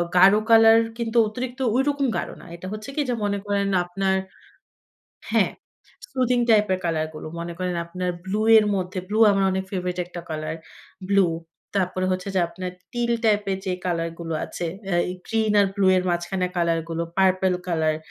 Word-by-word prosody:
গাঢ় 190 +3 +7
কালার 225 0 +7 0.2
কিন্তু 235 0 -2
অতিরিক্ত 250 +4 -5 0.2
ঐরকম 280 +1 +1
গাঢ় - - -3
না। - - -14
এটা 185 +2 -8
হচ্ছে 215 +5 -7
কি 300 - +1
যে - - +1
মনে 200 0 0
করেন 200 -1 0 0.2
আপনার 190 +2 0 1.2
হ্যাঁ, - - +3 0.6
সুদিং 250 -2 +1
টাইপ 210 -1 +5
এর 185 - +1
কালার 160 -2 0
গুলো। 155 - -8
মনে 170 0 -5
করেন 180 -1 -2
আপনার 180 +1 -3
ব্লু 205 +3 -2 0.2
এর 215 - +6
মধ্যে, 185 0 -3
ব্লু 215 +1 -1
আমার 195 -1 +2
অনেক 190 0 -1
ফেভারিট 180 -2 -3
একটা 175 -1 -8
কালার, 155 0 -3 0.6
ব্লু। 195 -2 +5 0.5
তারপরে 185 0 0
হচ্ছে 185 +1 -3
যে 185 - +3
আপনার 185 +1 -6 0.2
teal 240 -1 0
টাইপের 205 -3 +2
যে 185 - 0
কালার 165 -2 -1
গুলো 165 -1 -4
আছে 175 - -5 0.2
এ্যাঁ 175 -3 +2 0.2
গ্রিন 220 -1 +1
আর 200 - +4
ব্লু 200 -2 +2
এর 180 - +2
মাঝখানে 180 +2 -1
কালার 170 -1 +1
গুলো, 165 0 -2 0.2
পার্পল 185 0 +3
কালার 160 -3 +1
190 Hz, 175 wpm, -24 LUFS, 175-215 Hz, 1.2 s, গাঢ়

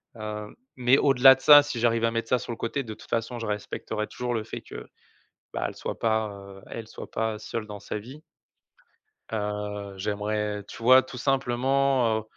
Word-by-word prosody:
hem, 105 -1 -6 0.2
mais 125 +1 +4
au-delà 135 -1 +7
de 130 - -16
ça, 145 +1 +9
si 145 -4 -4
j'arrive 115 0 +2
à 115 - +3
mettre 115 0 -3
ça 125 - +4
sur 120 - -6
le 115 - -5
côté, 135 +4 -2
de 110 -3 -7
toute - - -15
façon, 120 +1 -2
je 115 - -4
respecterai 105 +1 -3
toujours 125 -1 -3
le 110 - -2
fait - - -7
que, - - -10 0.7
bah, - - -2
elle - - -8
soit - - -5
pas, 110 -1 +1
heu, 100 -1 -11
elle 115 -2 -7
soit - - -10
pas 110 -1 -2
seule 110 0 -5
dans 105 -1 -8
sa 105 - -4
vie 130 +8 -11 1.1
heu, 105 -1 -3
j'aimerais, 105 +1 -2
tu - - -10
vois, 130 +2 +7
tout 130 -1 -9
simplement, 130 -2 +2
heu, - - -10
115 Hz, 200 wpm, -26 LUFS, 105-125 Hz, 1.1 s, ça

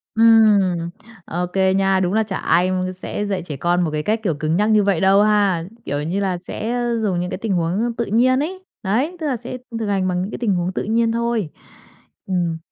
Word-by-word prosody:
Ừm, 205 -7 +4 0.4
ô 180 +2 -2
kê 190 +1 +1
nha. 195 -1 +2
Đúng 185 0 0
là 220 - +3
chả 215 - -4
ai 180 +2 +2
m 185 - 0 0.3
sẽ 205 - -3
dạy 195 -2 -2
trẻ 150 -5 -6
con 175 +3 +1
một 160 - 0
cái 150 0 -2
cách 215 +5 0
kiểu 175 -8 0
cứng 155 +3 -1
nhắc 210 +2 +2
như 215 -1 +5
vậy 195 -5 +1
đâu 195 +1 +5
ha, 205 -5 +2 0.2
kiểu 145 +1 -2
như 175 +6 -2
là, 190 -3 -1
sẽ, 210 +5 -5
a, 240 0 -1
dùng 185 -4 0
những 180 0 -3
cái - - -4
tình 210 -1 -2
huống 185 +7 0
tự 235 - +1
nhiên 255 +5 +3
ấy. 370 +4 -5 0.2
Đấy, 250 - 0
tức 315 - -2
là 270 -4 0
sẽ 245 +2 -7 0.2
thực 220 - -2
hành 195 -2 0
bằng 180 0 0
những 195 - -4
cái - - -6
tình 225 -5 +1
huống 175 +1 -1
tự - - -2
nhiên 225 +2 +1
thôi. 235 -5 -1 0.8
Ừm. 175 -3 -1
195 Hz, 240 wpm, -20 LUFS, 180-225 Hz, 0.8 s, như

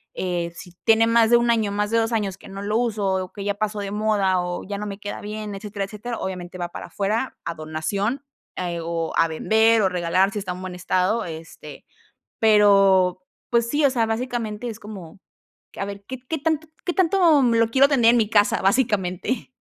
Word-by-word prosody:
Eh, 175 -2 -2
si 180 - -11
tiene 225 0 +5
más 230 -1 +4
de 240 - +7
1 235 0 +2
año, 220 -3 +1
más 210 +1 -1
de 230 - +3
2 225 +1 0
años 200 -4 -1
que 195 - -14
no 195 +1 -7
lo 210 +2 0
uso 220 -4 -1 0.2
o 185 - -17
que 200 - -7
ya 205 - 0
pasó 210 0 -3
de 200 -1 -4
moda 205 -3 +1
o 175 0 -4
ya 205 - -4
no 210 - -4
me 200 - -6
queda 205 0 -6
bien, 210 0 -6
etcétera, 200 0 -5
etcétera, 220 +4 -6
obviamente 180 -1 -6
va 175 -1 -4
para - - -8
afuera 215 +6 -2
a 170 - -2
donación, 195 - -3 0.3
eh, 175 -2 -3
o 165 0 -3
a 165 - +4
vender 220 +7 +3
o 190 - +3
regalar 180 +2 +1
si 210 - -3
está 190 -2 -4
en 180 - -9
buen 185 -1 -6
estado, 185 +5 0
este, 160 -2 -10 0.5
pero 195 -4 +5 0.3
pues 235 -1 +2
sí, 295 +4 +1
o 280 - +5
sea, 235 -3 +1
básicamente 230 -1 -3
es 220 - -7
como 195 -5 -10 0.6
q - - -8
a - - 0
ver, 200 0 -8
¿qué 260 -1 -6
qué 320 - -1
tanto 315 +1 -1 0.2
qué 355 - -1
tanto, 345 -5 +4
mm, 235 -2 +3
lo 230 0 +3
quiero 275 +3 +5
tener 245 -5 +5
en - - +3
mi 215 -1 +1
casa? 205 -3 +3
Básicamente. 205 0 0
210 Hz, 215 wpm, -23 LUFS, 185-230 Hz, 0.6 s, de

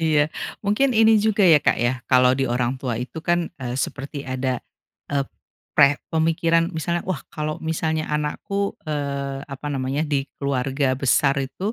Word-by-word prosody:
Iya 150 -2 +3 0.4
mungkin 245 +7 +2
ini 220 0 +6
juga 215 -1 +2
ya, 160 -3 +7
Kak, - - +2
ya 120 +2 +2
kalau 125 -1 +5
di 135 - +1
orang 120 +1 0
tua 125 -4 -2
itu 130 +6 -6
kan, 175 0 +1
eee, 125 -1 -3
seperti 140 +1 -4
ada, 130 -1 -2 0.5
eee, 140 -1 +1 0.5
pre 140 +1 +6 0.2
pemikiran 165 +1 +2
misalnya 170 +2 -1
wah 185 -7 -2
kalau 155 0 -3
misalnya 160 -1 -1
anakku, 150 +7 -2
eee, 140 -2 -3
apa 140 +1 -8
namanya 135 +2 -1
di 140 -2 0 0.2
keluarga 135 0 0
besar 140 +1 +3
itu, 185 - -3
145 Hz, 160 wpm, -23 LUFS, 135-165 Hz, 0.5 s, ya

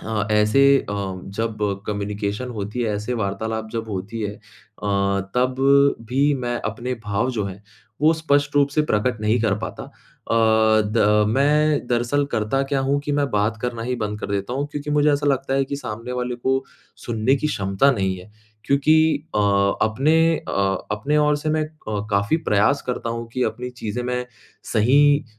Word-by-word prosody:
हाँ, 110 -2 -2
ऐसे 105 +5 +3 0.3
अ, - - -2 0.4
जब 115 -1 -2 0.3
कम्युनिकेशन 105 +3 -3
होती 105 +1 -4
है 110 -2 -1
ऐसे 105 +4 -3
वार्तालाप 110 +1 -3
जब 115 -1 -4
होती 105 +3 -5
है 105 -1 -2
अ, - - -16 1.0
तब 125 +1 +1 0.5
भी 140 +4 +2
मैं 120 -2 -2
अपने 125 +3 -4
भाव 105 +5 0
जो 110 -5 -2
है 100 +1 -7 0.4
वो 155 +2 +5
स्पष्ट 145 -3 +1
रूप 140 -1 +4
से 150 +2 +1
प्रकट 120 -4 0
नहीं 110 +2 +1
कर 110 -3 +2
पाता 110 - -6
अ, - - -15 1.0
द 110 - 0
अ, 105 0 +4
मैं 150 +1 +2
दरअसल 120 +4 +1
करता 110 +6 0
क्या 135 - +2
हूँ 140 +1 +1
कि 145 0 -3
मैं 145 -2 0
बात 105 +2 0
करना 120 -2 -3
ही 125 +2 -2
बंद 105 -2 -3
कर - - -5
देता 100 +4 -2
हूँ 140 +2 -1
क्योंकि 145 0 -4
मुझे 150 0 +3
ऐसा 145 +1 0
लगता 135 -1 +1
है 135 0 +2
कि 140 +1 -4
सामने 115 -2 -6
वाले 125 0 -2
को 130 +2 0 0.4
सुनने 120 +3 +1
की 150 - -1
क्षमता 100 -1 +2
नहीं 95 -7 -1
है 90 +4 -13 0.3
क्योंकि 140 +4 +3 0.4
अ - - +3 0.5
अपने 135 +9 +2 0.3
अ - - -3 0.4
अपने 140 +8 0
ओर 150 0 +3
से 150 +1 -4
मैं 155 0 +1
अ, 110 -10 -6
काफ़ी 100 +9 +2
प्रयास 105 +8 +3
करता 125 -2 -3
हूँ 115 0 -4
कि 130 - -1
अपनी 125 0 -3
चीज़ें 120 -1 -5
मैं 125 0 -2 0.5
सही 145 +6 +4
120 Hz, 180 wpm, -22 LUFS, 105-140 Hz, 1.0 s, वो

